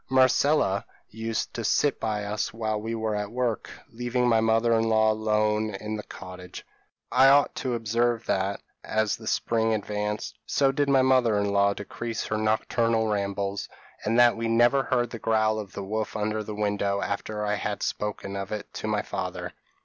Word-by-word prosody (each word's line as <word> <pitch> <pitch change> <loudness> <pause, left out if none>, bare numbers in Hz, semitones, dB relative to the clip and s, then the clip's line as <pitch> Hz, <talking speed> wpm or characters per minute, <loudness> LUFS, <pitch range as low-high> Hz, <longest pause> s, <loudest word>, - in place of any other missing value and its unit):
p> 130 - -2
"Marcella 130 -5 +3 0.3
used 110 0 -3
to 115 - -4
sit 145 +6 +2
by 105 -2 -2
us 105 +1 -2
while 110 -1 -2
we 115 +1 -3
were 110 -1 -1
at 105 0 -2
work, 120 -3 -1 0.2
leaving 120 +1 0
my 115 -2 +4
mother 115 +1 +3
in 115 0 +2
law 110 0 +4
alone 110 -1 0
in 105 +2 -4
the 105 - -4
cottage. 90 -3 -10 0.5
I 135 - +6
ought 140 +1 +5
to 125 -2 -1
observe 115 +1 0
that, 95 +1 -1 0.2
as 110 -1 0
the 110 - -11
spring 115 -1 +1
advanced, 105 0 -3
so 135 -1 +3
did 140 +1 0
my 135 -1 +5
mother 130 -5 +3
in 100 0 0
law 100 0 +3
decrease 115 +3 -5
her 110 - -1
nocturnal 110 +1 +1
rambles, 100 -1 -2 0.3
and 110 +2 +1
that 120 -1 +6
we 115 0 -2
never 120 +4 +4
heard 120 -2 0
the 115 - -6
growl 110 -1 +1
of 100 -3 -8
the 100 - -5
wolf 110 +3 -3
under 110 +1 -1
the 105 0 -6
window 100 -1 0
after 105 +1 -3
I 105 - 0
had 105 0 -3
spoken 100 -1 -3
of 100 -1 -5
it 105 -1 -5
to - - -5
my - - 0
father. - - -5
110 Hz, 190 wpm, -26 LUFS, 105-115 Hz, 0.5 s, I